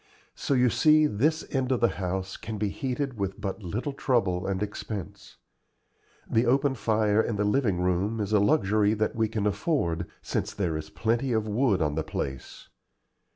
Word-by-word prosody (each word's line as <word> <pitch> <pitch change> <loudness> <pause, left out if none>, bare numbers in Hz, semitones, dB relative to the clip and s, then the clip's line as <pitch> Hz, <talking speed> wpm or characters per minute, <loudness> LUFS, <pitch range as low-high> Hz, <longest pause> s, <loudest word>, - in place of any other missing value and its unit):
So 140 - -1
you 125 -2 +4
see 155 +6 +5
this 150 +6 +1
end 130 -1 0
of 125 - +2
the 115 - +4
house 95 +1 -3
can 110 -1 -6
be 105 0 0
heated 130 +1 -3
with 95 +1 -3
but 100 +1 -4
little 110 - -3
trouble 100 -10 0
and 95 +1 -1
expense. 105 -2 -7 0.9
The 115 +2 +2
open 135 +2 +3
fire 110 -3 +2
in 115 - -2
the 105 - 0
living 105 -4 +1
room 90 +5 0
is 105 0 -2
a 105 - +5
luxury 105 -3 +3
that 110 0 -1
we 110 -1 +1
can 110 -2 -2
afford, 100 - 0 0.2
since - - -3
there 90 -6 -1
is 80 0 -5
plenty 120 +9 0
of 110 -1 0
wood 105 -5 +2
on 75 -1 0
the 80 +1 -1
place. 65 -3 -6
110 Hz, 180 wpm, -27 LUFS, 95-125 Hz, 0.9 s, see